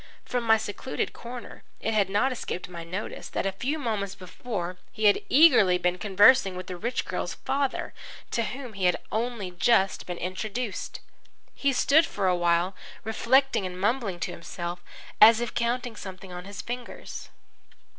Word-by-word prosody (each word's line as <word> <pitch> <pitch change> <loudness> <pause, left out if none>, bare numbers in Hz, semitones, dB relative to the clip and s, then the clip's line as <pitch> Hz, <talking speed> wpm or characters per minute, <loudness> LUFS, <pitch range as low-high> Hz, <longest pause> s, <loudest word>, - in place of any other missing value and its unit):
From 245 -1 -2
my 225 0 +6
secluded 220 +4 -4
corner 240 0 -9 0.2
it 225 - -1
had 205 -3 +2
not 210 +7 +2
escaped 230 -7 -4
my 170 -1 -8
notice 185 +5 -6
that - - -2
a 195 - +1
few 260 +11 -2
moments 210 -8 -2
before 185 -1 -5
he 215 - -2
had 205 - +8
been - - -7
eagerly 220 - +6
conversing 195 +4 +4
with 185 0 -6
the 180 - -6
rich 235 +8 -2
girl's - - -3
father, 275 -1 -2 0.4
to 235 - +1
whom 245 +1 -5
he 195 -2 -2
had 180 - +4
only 225 -4 -2
just 195 +2 +2
been 175 -1 -4
introduced. 205 +5 -4 0.5
He 280 - +1
stood 290 +4 +4
still - - -12
for 200 -2 0
a 180 - +3
while 175 +2 +1 0.3
reflecting 255 +3 +2
and 180 0 -8
mumbling 205 -3 0
to - - -2
himself, 175 +1 -6 0.4
as 220 +1 +9
if 240 -1 -3
counting 240 0 -1
something 190 -2 -9
on 180 0 -7
his 200 0 -7
fingers. 245 0 -7
205 Hz, 170 wpm, -27 LUFS, 185-240 Hz, 0.5 s, as